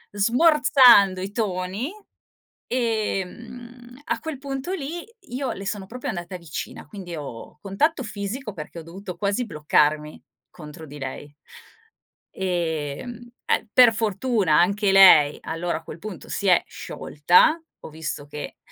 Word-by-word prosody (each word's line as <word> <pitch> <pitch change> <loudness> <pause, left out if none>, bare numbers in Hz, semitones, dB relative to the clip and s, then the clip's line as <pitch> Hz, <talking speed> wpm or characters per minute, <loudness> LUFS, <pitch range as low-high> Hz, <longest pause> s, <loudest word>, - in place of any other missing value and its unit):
Smorzando 245 - +5
i 195 +2 -5
toni, 200 - -2 0.8
ehm, 240 +2 -4
a - - -1
quel 320 -4 -6
punto 275 +4 -5
lì, 335 0 -5 0.2
io 255 +2 -3
le 195 +1 -8
sono 200 -1 -3
proprio 245 +6 -7
andata 175 +1 -5
vicina, 170 -2 -7
quindi 185 -4 -9
ho 145 -2 -8
contatto 265 +10 0
fisico 210 +2 -5
perché 160 0 -8
ho - - -7
dovuto 180 +2 -9
quasi 200 +6 -1
bloccarmi 150 -3 0 0.3
contro 155 -1 -11
di 145 0 -10
lei. 145 +1 -7 0.9
Ehm 175 - -3 0.2
ehm, - - +1
per 245 -2 +8
fortuna 215 - +1
anche 200 +3 +2
lei 180 -7 +8
allora 165 0 -3
a - - -17
quel - - -10
punto 195 -1 -9
si 200 - -3
è 180 - +5
sciolta, 175 - +2 0.2
ho - - -9
visto 160 -2 -5
che 145 0 -8
195 Hz, 135 wpm, -24 LUFS, 165-245 Hz, 0.9 s, per